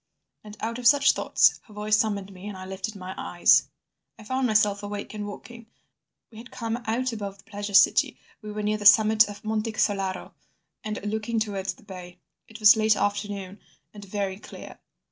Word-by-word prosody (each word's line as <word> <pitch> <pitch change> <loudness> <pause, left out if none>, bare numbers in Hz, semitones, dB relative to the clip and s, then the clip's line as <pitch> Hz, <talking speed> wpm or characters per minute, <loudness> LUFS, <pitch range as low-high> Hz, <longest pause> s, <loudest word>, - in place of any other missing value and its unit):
And 210 0 -12
out 230 +2 -3
of 245 - +2
such 280 +1 +6
thoughts - - +2
her 210 - -16
voice 210 +1 +1
summoned 200 -3 -1
me, 185 +2 -10
and 205 -2 -7
I 185 - -8
lifted 190 +3 -6
my 185 -1 -7
eyes. 175 - +3 0.5
"I 220 - -13
found 260 +3 -1
myself 210 -2 +2
awake 205 0 -6
and 210 -1 -5
walking. 230 +3 -11 0.6
We 220 - -12
had 245 +3 -12
come 230 0 -4
out 245 +2 -1
above 200 -3 -6
the - - -20
Pleasure 205 -1 -5
City, - - +4 0.2
we 210 -1 -8
were 210 0 -5
near 210 +1 0
the 205 - -8
summit 220 0 +6
of 205 +1 -11
Monte 220 +1 -2
Solaro 195 -4 -1 0.5
and 215 0 -4
looking 220 +2 -2
towards 200 -3 -3
the - - -21
bay. 180 -3 -10 0.3
It 220 0 -12
was 210 -1 +8
the 220 - -4
late 215 0 +3
afternoon 205 -1 -3 0.3
and 205 -1 -11
very 195 -1 -4
clear. - - -11
210 Hz, 195 wpm, -25 LUFS, 200-220 Hz, 0.6 s, was